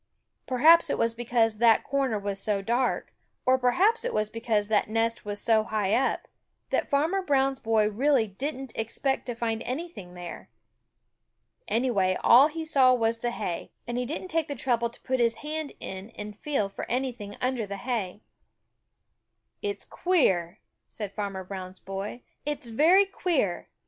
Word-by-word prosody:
Perhaps 315 +6 +6
it - - 0
was 230 0 +1
because 230 -2 +1
that 230 -1 +5
corner 270 -5 0
was 200 -1 -3
so 200 -2 -1
dark, 240 +4 0 0.3
or 260 0 +4
perhaps 365 - +3
it - - -2
was 215 0 0
because 225 -2 0
that 210 -1 +1
nest 225 +1 0
was 205 0 -4
so 220 -1 +3
high 210 -2 -1
up, 265 - +1 0.4
that - - 0
Farmer 320 +7 +2
Brown's 270 -5 +1
boy 220 -2 +2
really 250 +3 +2
didn't 265 +5 -5
expect 245 +5 -1
to 245 - -3
find 225 -1 -2
anything 255 - -6
there. 175 -1 -8 1.2
Anyway, 205 -6 +1
all 260 +5 +8
he 320 +1 -5
saw 260 -4 +5
was 230 -1 0
the 240 - -1
hay, 175 -7 -4 0.2
and 240 - -4
he 250 - -1
didn't 325 +6 -5
take 325 -2 0
the 285 - -4
trouble 235 -3 0
to 235 - -10
put 260 0 0
his 230 -1 +3
hand 310 -1 -4
in 190 +3 -7
and 210 0 -7
feel 270 -3 -1
for 195 - -7
anything 240 -5 -3
under 250 -4 -1
the 200 0 -5
hay. 220 -4 -3 1.4
"It's 405 -1 -3
queer," 195 - +1 0.3
said 210 -3 -6
Farmer 200 -3 -4
Brown's 185 0 -7
boy. 195 +5 -6 0.2
"It's 295 -5 -4
very 330 - +5
queer! 335 - -1
235 Hz, 165 wpm, -27 LUFS, 210-275 Hz, 1.4 s, all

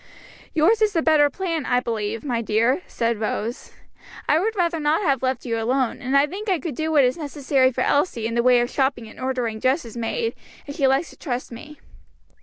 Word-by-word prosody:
"Yours 360 +9 +3
is 425 -1 +3
the 330 - +2
better 300 -2 +4
plan, 330 -1 -3
I 245 -1 +2
believe, 225 -2 -3
my 245 -5 -1
dear," 230 +8 +1
said 230 -2 -1
Rose. 220 +2 -3 0.6
"I 305 - +4
would 435 +5 -1
rather 340 -3 0
not 305 +5 +1
have 275 -6 +2
you 260 - 0
left 255 -1 -2
alone, 240 +2 -1
and 265 +3 +1
I 280 - +5
think 400 +8 -6
I 370 - +2
could 315 0 -5
do 315 +5 -2
what 295 -3 +5
is 250 +3 +1
necessary 280 -3 +1
for - - -3
Elsie, 285 -6 +1
in 230 - -2
the 235 - +2
way 250 0 +5
of 240 - -1
shopping 265 -4 0
and - - -14
ordering 250 -4 -2
dresses 255 -2 0
made, 455 - -2 0.3
if 285 - -7
she 275 -4 +3
likes 270 +5 +1
to - - -17
trust 250 -5 -4
me." 295 +6 -11
265 Hz, 215 wpm, -23 LUFS, 235-315 Hz, 0.6 s, I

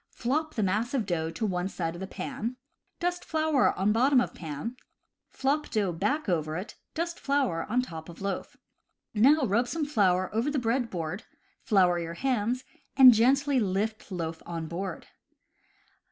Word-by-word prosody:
Flop 305 +6 -2
the 220 - +1
mass 215 +7 0
of 235 -5 0
dough 165 -4 -1
to 165 +7 -3
one 180 -2 -1
side 170 -3 -3
of 190 +2 -6
pan, 235 +4 -4 0.4
dust 355 0 -1
flour 315 -4 +2
on 195 +3 +2
bottom 255 +4 +4
of 245 - -1
pan, 160 - -5 0.5
flop 290 +3 -1
dough 205 -5 0
back 285 - -1
over 155 -3 0
it, 190 +5 -7 0.2
dust 340 +1 -3
flour 270 -13 0
on 250 +3 +2
top 160 -7 -8
of 170 - -11
loaf. 195 0 -4 0.6
Now 265 +7 +5
rub 235 +3 +1
some 315 +4 -2
flour 190 -10 +2
over 230 +6 +1
the 295 - -1
bread 240 0 0
board, 175 +1 -4 0.4
flour 185 -6 +3
your 170 0 -5
hands, 250 +2 0 0.3
and 260 -2 +10
gently 270 +4 +3
lift 210 +1 -2
loaf 165 -3 -4
on 165 -1 -4
board. 175 +2 -5
220 Hz, 165 wpm, -28 LUFS, 180-265 Hz, 0.6 s, and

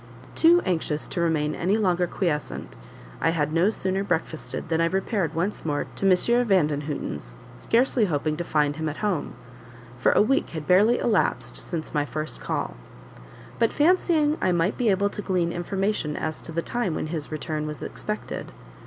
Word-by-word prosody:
Too 340 +2 +5
anxious 160 -4 -1
to 170 - -2
remain 155 -3 +1
any 190 +7 +1
longer 180 -4 +2
quiescent, 165 -5 -3 0.5
I - - +3
had 155 -2 0
no 170 +5 +4
sooner 190 -2 -1
breakfasted, 160 -4 -3
than 165 0 +1
I - - +4
repaired 190 -1 -1
once 180 +5 -1
more 145 -2 -1
to 195 - +2
M. 235 +7 +3
Vandenhuten's, 145 - -1 0.2
scarcely 240 -1 +2
hoping 155 -3 -1
to 175 - -2
find 150 -3 +1
him 160 -1 -1
at 150 - -6
home; 185 -8 -1 0.6
for - - +4
a - - +5
week 270 +5 +1
had 155 - -5
barely 205 +8 +5
elapsed 215 -5 0
since 165 -3 -5
my 150 -1 +2
first 155 +1 -4
call: - - -2 0.9
but 230 -1 +3
fancying 315 -2 +3
I 185 - +2
might 175 +3 +1
be 245 -4 +1
able 200 +1 +2
to 210 - -5
glean 180 -4 0
information 190 -2 -1
as 155 - -3
to - - -9
the 165 +1 -2
time 225 -9 -1
when - - -2
his 155 -2 -2
return 155 0 -3
was 150 -3 -6
expected. - - -5
175 Hz, 175 wpm, -25 LUFS, 155-205 Hz, 0.9 s, Too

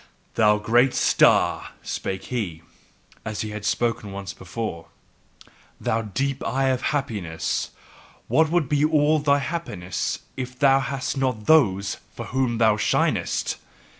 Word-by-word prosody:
"Thou 105 -1 +4
great 120 +5 +3
star," - - +3
spake 95 0 -4
he, 85 -9 -3 0.6
as 110 0 -4
he 110 -2 -4
had 105 0 -6
spoken 115 -1 -1
once 100 0 -6
before, 95 -2 -6 0.9
"thou 115 - 0
deep 130 +6 -2
eye 135 +1 +1
of 130 -1 0
happiness, 105 - -2 0.6
what 155 +7 +3
would 170 -3 +1
be 145 +1 +1
all 155 0 +3
thy 145 -1 +3
happiness 135 - -3 0.2
if 125 -1 -6
thou 135 -1 +5
hadst 140 +1 -3
not 125 -5 -1
THOSE 100 -11 +3 0.2
for - - -6
whom 130 -2 0
thou 110 -2 +4
shinest! - - 0
120 Hz, 135 wpm, -24 LUFS, 105-140 Hz, 0.9 s, thou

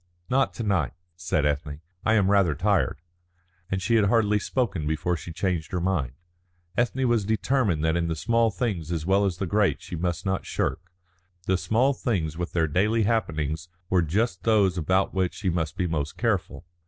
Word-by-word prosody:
"Not 135 +1 +2
to 120 - -4
night," 95 - 0 0.2
said 85 -4 -1
Ethne. 75 0 -1 0.2
"I 110 - +3
am 100 -2 +3
rather 95 -7 +3
tired." 95 -1 +1 0.7
And 95 -1 -2
she 115 +3 +3
had 105 - +4
hardly 105 0 +3
spoken 100 - -1
before 80 +3 0
she 85 +1 -8
changed 90 -2 -2
her 90 - -1
mind. 85 -9 -1 0.6
Ethne 125 +2 +1
was 120 -3 +2
determined 110 - +1
that 80 0 +2
in 85 -1 0
the 80 - -1
small 115 +7 +2
things 100 -8 -3
as 80 -2 -2
well 100 +2 +3
as 95 -3 0
in - - -20
the - - +1
great 105 -1 +2
she - - -7
must 85 +2 -2
not 95 -1 -1
shirk. - - -2 0.6
The 95 - +2
small 110 +10 +2
things 90 - -1
with 85 +1 -4
their 80 -2 +2
daily 105 +8 +2
happenings 80 -7 -1 0.2
were 90 -1 +4
just 90 +4 0
those 105 -5 +3
about 95 +3 +1
which 95 -2 0
she 95 -4 -1
must 80 -2 -2
be 90 - 0
most 75 -3 -2
careful. 100 -6 -1
95 Hz, 190 wpm, -26 LUFS, 80-110 Hz, 0.7 s, had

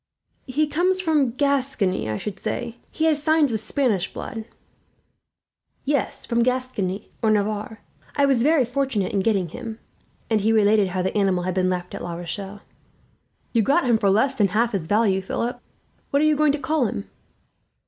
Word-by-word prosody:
"He 285 +4 +1
comes 355 +5 +1
from 310 -7 +2
Gascony, 265 - 0
I 110 - -1
should 205 - -6
say. 240 -1 -4
He 320 - -1
has 305 -2 +2
signs 310 -3 +3
of 220 - 0
Spanish 220 -4 0
blood." 225 -1 -6 1.4
"Yes, 285 -1 -1
from 235 -1 +1
Gascony 235 -6 -1
or 220 - +2
Navarre. 215 +1 -1 0.3
I 285 - +4
was 270 -4 +3
very 290 0 +4
fortunate 245 -6 -1
in 200 - +2
getting 195 -4 +1
him," 225 +4 -7 0.5
and 220 -2 +1
he 220 +3 +2
related 210 -2 +4
how 185 0 -2
the 190 - -2
animal 190 -3 +2
had 185 +1 -1
been 185 0 +1
left 180 -1 -3
at - - -6
La 170 -1 -4
Rochelle. 195 +4 -6 0.9
"You 230 - +4
got 285 +10 +2
him 235 -3 +3
for 200 - +2
less 225 +8 +3
than 210 -6 +2
half 225 +5 +1
his 190 -7 -3
value, 205 -2 +2
Philip. 240 +6 -3 0.5
What 280 +2 +2
are - - +4
you 310 0 +4
going 300 -1 +3
to - - 0
call 285 -2 0
him?" 100 - -5
225 Hz, 180 wpm, -23 LUFS, 195-275 Hz, 1.4 s, I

